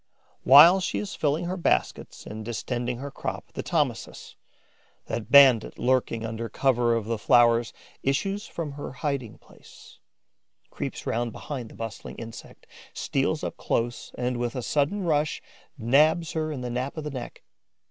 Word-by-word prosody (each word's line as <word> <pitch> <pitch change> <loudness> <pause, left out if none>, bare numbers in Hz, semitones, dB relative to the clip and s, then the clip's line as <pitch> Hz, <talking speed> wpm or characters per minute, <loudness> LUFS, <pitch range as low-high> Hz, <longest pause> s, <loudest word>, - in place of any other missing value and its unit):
While 165 +8 +8
she 185 - -2
is 205 - -4
filling 155 +3 0
her 180 +2 -2
baskets 60 - -1
and 110 +1 -7
distending 120 +1 -3
her 140 +3 -7
crop, - - -6
the - - -4
Thomisus, - - -2 0.7
that 110 -3 -5
bandit 135 -5 +6
lurking 125 -3 0
under 115 0 -4
cover 120 -1 +2
of 115 -2 -2
the 115 0 -2
flowers, 120 -1 +4 0.3
issues 195 +10 -1
from 160 -4 -5
her 140 -1 -7
hiding 135 -5 -3
place, - - -18 0.7
creeps - - -5
round 120 0 -1
behind 130 -6 -6
the - - -14
bustling 115 -3 -7
insect, 115 -1 -10 0.3
steals - - -1
up - - -4
close 120 +1 -2
and, 125 0 -1
with 120 +1 -2
a 125 - -3
sudden 150 - 0
rush, 150 -3 0 0.4
nabs 150 +7 +3
her 155 -1 -2
in 140 -4 -5
the 125 -1 -4
nape 130 +5 -3
of 155 - -4
the 150 - -5
neck. 125 -3 -8
125 Hz, 160 wpm, -26 LUFS, 115-150 Hz, 0.7 s, While